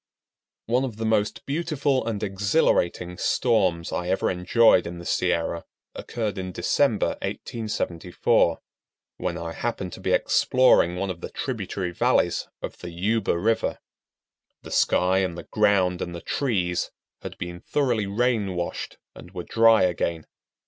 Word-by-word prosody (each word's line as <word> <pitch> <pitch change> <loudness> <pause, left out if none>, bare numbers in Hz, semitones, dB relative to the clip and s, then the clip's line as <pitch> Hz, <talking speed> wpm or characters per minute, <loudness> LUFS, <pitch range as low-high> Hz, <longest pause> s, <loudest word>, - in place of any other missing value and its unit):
One 125 +3 +1
of 120 -5 -4
the 110 - -3
most 110 0 0
beautiful 145 -5 0
and 110 -2 -2
exhilarating 95 - +1
storms 95 -9 +1
I 90 - -2
ever 95 - +1
enjoyed 90 +1 +4
in 85 +1 -6
the 85 - -9
Sierra 85 -2 0 0.3
occurred 105 -4 -4
in 95 0 -4
December, 105 +6 +1
1874, 90 -6 -1 0.6
when 85 -1 -3
I 85 -1 -5
happened 100 -6 -3
to - - -9
be - - -2
exploring 130 -9 +4
one 95 +1 -2
of 85 -2 -9
the - - -5
tributary 100 -7 -4
valleys 85 - +1 0.2
of - - -6
the 90 - -7
Yuba 95 +3 0
River. 110 +5 0 0.9
The - - -10
sky 95 +1 +3
and 90 -3 -1
the - - -7
ground 95 -4 +2
and 85 0 -4
the 85 - -7
trees 95 -9 -1 0.3
had - - -8
been 85 0 -6
thoroughly 120 -8 0
rain 105 -2 0
washed 85 0 -4 0.2
and - - -12
were 90 - -4
dry 115 +1 +5
again. 85 -2 -1
95 Hz, 145 wpm, -25 LUFS, 90-115 Hz, 0.9 s, dry